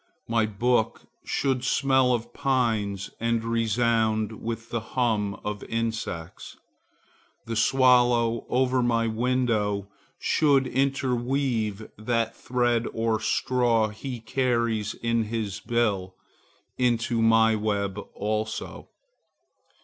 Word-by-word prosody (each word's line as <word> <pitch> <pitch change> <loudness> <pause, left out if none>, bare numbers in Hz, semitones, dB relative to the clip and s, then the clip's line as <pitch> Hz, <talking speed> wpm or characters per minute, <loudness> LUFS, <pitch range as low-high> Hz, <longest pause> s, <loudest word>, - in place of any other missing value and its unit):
My 115 -1 +2
book 110 +2 0 0.2
should 130 -3 -1
smell 130 -1 +3
of 120 -2 -2
pines 110 -7 0
and 115 0 0
resound 115 -1 0
with 115 0 -5
the 120 - 0
hum 110 -3 -1
of 105 -1 -4
insects. 110 -7 -4 0.9
The 115 - -4
swallow 120 -1 +3
over 130 0 +2
my 115 -1 +1
window 110 -4 0 0.3
should 140 -4 +3
interweave 125 -5 -1
that 115 0 -1
thread 120 -2 0
or 115 -1 0
straw 120 -1 +1
he 120 +4 -6
carries 115 -3 0
in 115 -1 0
his 105 -3 -3
bill 105 -6 -1 0.6
into 120 -2 +1
my 115 0 +5
web 105 -2 -1 0.2
also. 110 +1 -3
115 Hz, 100 wpm, -26 LUFS, 110-125 Hz, 0.9 s, my